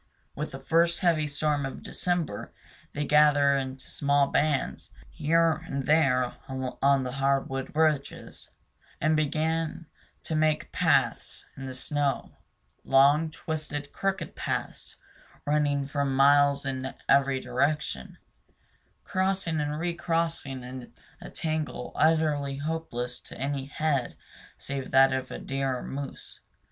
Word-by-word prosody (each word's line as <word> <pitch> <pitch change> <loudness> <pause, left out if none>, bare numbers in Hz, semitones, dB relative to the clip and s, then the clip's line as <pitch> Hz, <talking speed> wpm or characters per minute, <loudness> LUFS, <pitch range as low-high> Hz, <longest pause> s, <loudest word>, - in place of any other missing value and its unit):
With 150 +2 -3
the 135 - -8
first 170 +3 +2
heavy 165 -4 +2
storm 145 0 0
of 135 - -6
December, 175 - -2 0.4
they 150 +1 -2
gather 145 -1 +5
in 130 -1 -3
small 140 +1 +1
bands 145 - 0 0.2
here 165 +1 +2
and 135 -1 -3
there 130 -5 +3
on 135 +1 +1
the 125 - -3
hardwood 135 0 -1
ridges, 155 -3 -1 0.5
and 155 +1 +2
begin 160 +2 -1 0.4
to - - -4
make 155 0 +1
paths - - +1
in 135 0 -7
the 130 - -6
snow, 145 +1 -2 0.4
long, 140 +4 +4
twisted, 150 -2 -5
crooked 195 0 -2
paths, - - -4 0.5
running 145 -1 +1
for 140 +1 -1
miles 140 +1 +4
in 130 0 -3
every 135 -1 +4
direction, 130 - -1 0.9
crossing 185 -4 0
and 150 0 -2
recrossing 165 -5 -2
in 125 0 -8 0.3
a - - -8
tangle 155 -6 -3
utterly 150 -3 +2
hopeless 140 -5 -3
to - - -12
any 135 0 -2
head 140 -3 -1 0.4
save 135 -1 -5
that 135 0 +5
of 130 0 -2
a - - -6
deer 135 -1 -2
or - - -7
moose. 140 0 -6
145 Hz, 125 wpm, -28 LUFS, 135-155 Hz, 0.9 s, gather